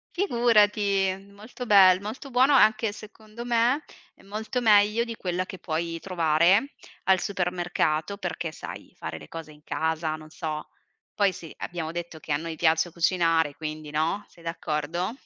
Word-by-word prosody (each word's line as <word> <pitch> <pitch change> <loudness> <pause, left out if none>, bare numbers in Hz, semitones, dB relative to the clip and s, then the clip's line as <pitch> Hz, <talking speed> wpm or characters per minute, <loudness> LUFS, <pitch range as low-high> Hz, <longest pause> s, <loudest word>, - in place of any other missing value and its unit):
Figurati, 205 - +2
molto 215 +5 -9
bel 190 -2 +7
molto 255 +7 -7
buono, 260 +4 +4
anche 220 -3 +4
secondo 215 +2 -11
me, 240 +5 +2 0.3
è - - -21
molto 215 +5 -3
meglio 210 0 +4
di 230 -1 -6
quella 185 -2 -2
che 190 - -9
puoi 165 0 -3
trovare 175 - +2 0.3
al 190 -1 +4
supermercato 175 -2 -1
perché, 175 -3 -4
sai, - - -9
fare 80 0 -6
le - - -12
cose 165 -2 -8
in 150 0 -18
casa, 160 0 -1
non 155 0 -12
so. 155 -2 -5 0.5
Poi, 200 -2 +3
sì, 165 -2 -10
abbiamo 165 -2 -4
detto 170 -1 -6
che 155 - -8
a 145 - +2
noi 165 0 -5
piace 160 +1 +2
cucinare, 165 -3 +2
quindi, 155 -1 -6
no, 160 +7 0
sei 170 - -19
d'accordo? 165 +2 -2
180 Hz, 155 wpm, -26 LUFS, 160-210 Hz, 0.5 s, bel